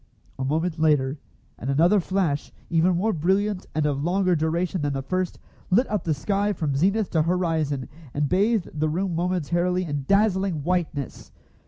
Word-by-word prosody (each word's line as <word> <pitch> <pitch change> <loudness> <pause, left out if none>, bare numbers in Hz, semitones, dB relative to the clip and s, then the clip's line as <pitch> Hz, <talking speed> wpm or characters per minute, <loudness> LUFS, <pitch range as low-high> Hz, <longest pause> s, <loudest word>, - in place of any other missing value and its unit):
A - - -1
moment 160 +4 -1
later, 145 -3 +2 0.4
and 130 - -4
another 170 +9 +4
flash, 175 -6 -1 0.2
even 170 +2 +3
more 215 +5 +1
brilliant 190 +4 0
and 155 -1 +1
of 140 -1 0
longer 185 +1 +2
duration 170 +3 -1
than 145 -1 -1
the 135 0 -3
first, 185 +4 -2 0.3
lit 235 +8 +3
up 210 -5 -1
the 160 - +2
sky 200 +7 0
from 155 -6 -2
zenith 195 +7 +1
to 160 - +3
horizon, 160 -5 0 0.2
and 145 +2 0
bathed 200 +4 +1
the 155 +1 0
room 180 +3 -1
momentarily 180 +1 0
in 145 -5 -3
dazzling 195 -6 +2
whiteness. 165 -6 -2
170 Hz, 165 wpm, -24 LUFS, 150-185 Hz, 0.4 s, another